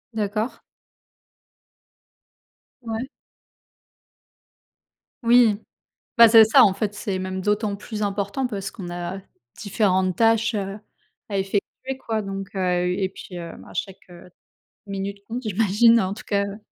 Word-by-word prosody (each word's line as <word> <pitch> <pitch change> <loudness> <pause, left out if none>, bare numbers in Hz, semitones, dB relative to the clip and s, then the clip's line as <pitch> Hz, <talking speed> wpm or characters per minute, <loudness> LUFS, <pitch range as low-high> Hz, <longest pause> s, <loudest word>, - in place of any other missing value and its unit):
D'accord. 215 +3 -2 2.2
Ouais. 230 +2 -4 2.2
Oui. 230 -3 +5 0.6
Bah, 230 -1 +10
c'est 225 0 +9
ça 245 +3 +6
en 195 -2 +3
fait. 210 +1 -2
C'est 200 -3 -3
même 185 0 -4
d'autant 210 +1 0
plus 210 +1 -6
important 200 +5 -1
parce 195 -4 -5
qu'on 180 -5 -8
a 175 +2 -5 0.4
différentes 190 -3 +1
tâches, 225 0 +3
heu, 195 0 -3 0.5
à 200 -2 -2
effectuer, 205 +7 -3
quoi. 220 -1 -1
Donc 195 0 -6
heu, 180 -1 0
et 190 -1 0
puis, 185 -1 -11
hem, 170 -1 -8
à - - -14
chaque, 190 -1 -6
heu, 175 +1 -13 0.6
minute 200 0 -4
compte. 240 +3 -5
J'imagine, 225 +2 +4
en 190 +1 -1
tout - - -11
cas, 200 -1 +1
heu, 200 +1 -7
200 Hz, 135 wpm, -23 LUFS, 190-225 Hz, 2.2 s, Bah